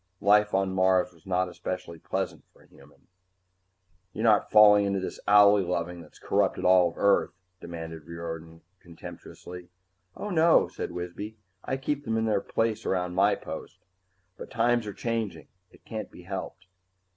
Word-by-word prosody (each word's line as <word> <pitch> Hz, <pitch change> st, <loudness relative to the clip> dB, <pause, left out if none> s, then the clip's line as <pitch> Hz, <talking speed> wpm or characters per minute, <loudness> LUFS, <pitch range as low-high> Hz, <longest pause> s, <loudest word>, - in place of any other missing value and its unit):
Life 105 Hz, 0 st, +4 dB
on 95 Hz, -1 st, 0 dB
Mars 95 Hz, -1 st, +2 dB
was 85 Hz, 0 st, -22 dB
not 90 Hz, 0 st, +1 dB
especially 90 Hz, -1 st, -6 dB
pleasant -, -, -4 dB
for -, -, -23 dB
a -, -, -24 dB
human. -, -, -21 dB, 1.1 s
"You're 110 Hz, -, -4 dB
not 110 Hz, -3 st, +4 dB
falling 105 Hz, -1 st, +7 dB
into 100 Hz, 0 st, 0 dB
this 95 Hz, -, -6 dB
owlie 105 Hz, 0 st, +6 dB
loving 85 Hz, -1 st, -3 dB
that's 80 Hz, -, -16 dB
corrupted -, -, 0 dB
all 90 Hz, -1 st, +4 dB
Earth?" 100 Hz, -2 st, +3 dB, 0.3 s
demanded 80 Hz, -2 st, -8 dB
Riordan 80 Hz, -1 st, -7 dB, 0.2 s
contemptuously. 90 Hz, +1 st, -11 dB, 0.5 s
"Oh, 205 Hz, -, -5 dB
no," 165 Hz, -1 st, +4 dB
said -, -, -6 dB
Wisby. 90 Hz, +5 st, -6 dB, 0.3 s
"I 130 Hz, -, -2 dB
keep 145 Hz, +1 st, -3 dB
them 110 Hz, -3 st, -1 dB
in 110 Hz, -, 0 dB
their 105 Hz, -3 st, +1 dB
place 115 Hz, -1 st, -1 dB
around 90 Hz, -1 st, -1 dB
my 95 Hz, -, +3 dB
post. -, -, -8 dB, 0.6 s
But -, -, -9 dB
times 120 Hz, -2 st, +1 dB
are 100 Hz, -, -5 dB
changing. 115 Hz, -, -4 dB, 0.2 s
It -, -, -22 dB
can't 110 Hz, -1 st, -6 dB
be 90 Hz, -, -14 dB
helped." 95 Hz, 0 st, -6 dB
95 Hz, 155 wpm, -27 LUFS, 90-105 Hz, 1.1 s, falling